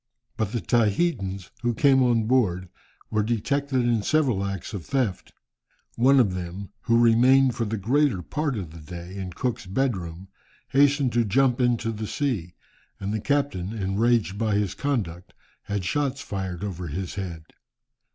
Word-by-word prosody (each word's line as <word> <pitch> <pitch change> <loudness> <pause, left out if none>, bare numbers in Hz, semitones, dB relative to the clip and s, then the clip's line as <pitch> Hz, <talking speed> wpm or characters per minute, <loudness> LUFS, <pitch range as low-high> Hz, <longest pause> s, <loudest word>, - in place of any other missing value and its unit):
But 110 -3 -2
the 120 - -2
Tahitans 100 - 0
who 120 -1 0
came 135 +2 +4
on 120 -3 +3
board 100 -7 +1 0.4
were 110 - +2
detected 130 +5 0
in 120 -2 +2
several 125 -5 +1
acts 100 +1 -4
of 100 -5 -5
theft. 125 - -2 0.6
One 135 +3 +5
of 105 -7 +3
them, 90 +2 -6 0.2
who 115 -1 +4
remained 125 +3 +5
for 115 - -2
the 110 +1 -2
greater 120 -1 +1
part 145 - -2
of 90 -6 -5
the 85 - -11
day 85 +3 -9
in 95 -2 -5
Cook's 115 -1 -3
bedroom, 95 -6 -2 0.4
hastened 140 -2 +3
to 120 0 +3
jump 125 +4 +2
into 120 -2 +1
the 110 -1 -5
sea, 110 - -2 0.4
and 100 +1 -3
the 110 - -2
captain, 140 -9 -1
enraged 105 0 +1
by 110 -2 +1
his 100 -3 0
conduct, 100 - -3 0.3
had 100 -3 -3
shots 140 +6 0
fired 95 -6 -4
over 90 -3 -4
his 90 +4 -4
head. 90 -5 -5
110 Hz, 160 wpm, -25 LUFS, 95-130 Hz, 0.6 s, One